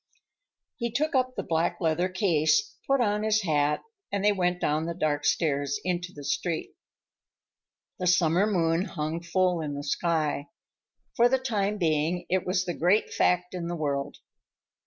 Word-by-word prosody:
He 235 Hz, -1 st, -2 dB
took 300 Hz, +7 st, -1 dB
up 255 Hz, -1 st, +1 dB
a -, -, -2 dB
black 170 Hz, +1 st, 0 dB
leather 170 Hz, +2 st, +1 dB
case, 185 Hz, -, +1 dB
put 275 Hz, -1 st, +3 dB
on 210 Hz, -2 st, +1 dB
his 215 Hz, 0 st, +2 dB
hat, 150 Hz, -3 st, +1 dB, 0.3 s
and 200 Hz, 0 st, -1 dB
they 210 Hz, -, +6 dB
went 180 Hz, -2 st, 0 dB
down 155 Hz, +1 st, 0 dB
the 170 Hz, -, -3 dB
dark 150 Hz, -3 st, -1 dB
stairs 145 Hz, -2 st, +1 dB
into 180 Hz, 0 st, -2 dB
the 145 Hz, -5 st, -10 dB
street. 160 Hz, +4 st, -2 dB, 1.2 s
The 180 Hz, -, -1 dB
summer 175 Hz, +2 st, +3 dB
moon 170 Hz, -3 st, +1 dB
hung 155 Hz, -1 st, -3 dB
full 180 Hz, 0 st, +1 dB
in 145 Hz, -2 st, -4 dB
the 145 Hz, -, -5 dB
sky. 155 Hz, -2 st, -1 dB, 0.7 s
For 240 Hz, 0 st, +5 dB
the 265 Hz, -, +3 dB
time 210 Hz, -5 st, -1 dB
being, 165 Hz, 0 st, 0 dB
it 185 Hz, 0 st, 0 dB
was 185 Hz, 0 st, +1 dB
the 175 Hz, -, -2 dB
great 180 Hz, +7 st, +2 dB
fact 180 Hz, 0 st, +1 dB
in 175 Hz, -2 st, -4 dB
the 175 Hz, -, -3 dB
world. 145 Hz, -3 st, -2 dB
175 Hz, 165 wpm, -27 LUFS, 155-200 Hz, 1.2 s, they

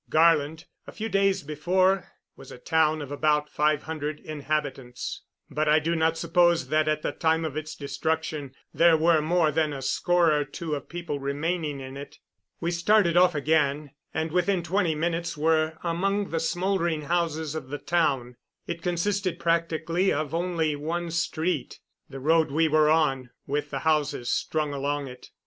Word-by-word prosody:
Garland, 160 Hz, 0 st, +3 dB, 0.2 s
a -, -, -8 dB
few 220 Hz, +1 st, -4 dB
days 195 Hz, -3 st, +2 dB
before, 185 Hz, +6 st, +1 dB, 0.3 s
was 135 Hz, -, -13 dB
a -, -, -9 dB
town 155 Hz, +2 st, +1 dB
of 140 Hz, -, -9 dB
about 150 Hz, 0 st, +1 dB
five 150 Hz, 0 st, +1 dB
hundred 155 Hz, -1 st, -4 dB
inhabitants; 145 Hz, -4 st, -4 dB, 0.3 s
but 150 Hz, +1 st, -1 dB
I 155 Hz, -, +6 dB
do 165 Hz, +2 st, 0 dB
not 160 Hz, 0 st, +1 dB
suppose 175 Hz, -1 st, +2 dB
that, 155 Hz, 0 st, +2 dB
at 155 Hz, 0 st, 0 dB
the -, -, -1 dB
time 160 Hz, 0 st, +1 dB
of 150 Hz, -3 st, -4 dB
its 155 Hz, 0 st, -5 dB
destruction, 145 Hz, 0 st, -3 dB, 0.2 s
there 170 Hz, -1 st, +5 dB
were 160 Hz, 0 st, +4 dB
more 160 Hz, 0 st, +2 dB
than 155 Hz, 0 st, +1 dB
a 135 Hz, -, -6 dB
score 175 Hz, +5 st, +2 dB
or 150 Hz, -1 st, +2 dB
two 155 Hz, +3 st, -6 dB
of 140 Hz, -2 st, -5 dB
people 170 Hz, -4 st, -4 dB
remaining 145 Hz, +2 st, -2 dB
in 130 Hz, +1 st, -8 dB
it. 140 Hz, -, -10 dB, 0.4 s
We 170 Hz, +1 st, -1 dB
started 175 Hz, 0 st, +3 dB
off 180 Hz, -1 st, +5 dB
again, 150 Hz, -1 st, +1 dB, 0.2 s
and 160 Hz, 0 st, -2 dB
within 180 Hz, +1 st, +1 dB
twenty 175 Hz, -1 st, 0 dB
minutes 170 Hz, +1 st, -2 dB
were 160 Hz, +1 st, +1 dB
among 195 Hz, +4 st, -1 dB
the 165 Hz, -, 0 dB
smoldering 170 Hz, -2 st, 0 dB
houses 160 Hz, -2 st, -1 dB
of 155 Hz, -4 st, -5 dB
the 145 Hz, -, -4 dB
town. 135 Hz, -8 st, 0 dB, 0.3 s
It 170 Hz, 0 st, -5 dB
consisted 185 Hz, +2 st, -1 dB
practically 165 Hz, +2 st, 0 dB
of 150 Hz, 0 st, -2 dB
only 165 Hz, -3 st, 0 dB
one 165 Hz, +3 st, -3 dB
street 165 Hz, -1 st, -2 dB, 0.3 s
the 135 Hz, -, -8 dB
road 160 Hz, +3 st, +3 dB
we 160 Hz, +3 st, +2 dB
were 155 Hz, 0 st, +4 dB
on 135 Hz, -5 st, +2 dB, 0.2 s
with 145 Hz, +1 st, -2 dB
the 135 Hz, -, -3 dB
houses 150 Hz, -6 st, +1 dB
strung 155 Hz, -2 st, -1 dB
along 140 Hz, 0 st, -2 dB
it. 125 Hz, 0 st, -12 dB
160 Hz, 170 wpm, -26 LUFS, 150-170 Hz, 0.4 s, I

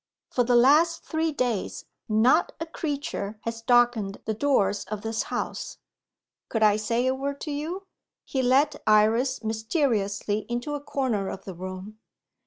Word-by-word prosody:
For 245 Hz, -, +2 dB
the 245 Hz, +1 st, +2 dB
last 300 Hz, +7 st, +5 dB
three 320 Hz, 0 st, -1 dB
days 245 Hz, -8 st, -2 dB, 0.2 s
not 235 Hz, +10 st, +3 dB
a 325 Hz, -, -3 dB
creature 285 Hz, -10 st, -4 dB
has 230 Hz, 0 st, -4 dB
darkened 240 Hz, -4 st, +2 dB
the 220 Hz, -, -1 dB
doors 210 Hz, -5 st, +1 dB
of 210 Hz, -1 st, -6 dB
this 225 Hz, 0 st, -1 dB
house. -, -, -4 dB, 0.7 s
Could 225 Hz, -2 st, 0 dB
I 210 Hz, -1 st, +6 dB
say 230 Hz, +3 st, 0 dB
a 260 Hz, -, +2 dB
word 280 Hz, +1 st, -3 dB
to 305 Hz, -, -4 dB
you?" 325 Hz, +7 st, -4 dB, 0.4 s
He 265 Hz, -, -1 dB
led 275 Hz, +4 st, +3 dB
Iris 225 Hz, +5 st, +3 dB
mysteriously 220 Hz, -, -1 dB
into 240 Hz, +5 st, -3 dB
a 290 Hz, -, -3 dB
corner 260 Hz, -9 st, -1 dB
of -, -, -7 dB
the 190 Hz, -, -7 dB
room. 185 Hz, +4 st, -8 dB
240 Hz, 155 wpm, -26 LUFS, 215-285 Hz, 0.7 s, I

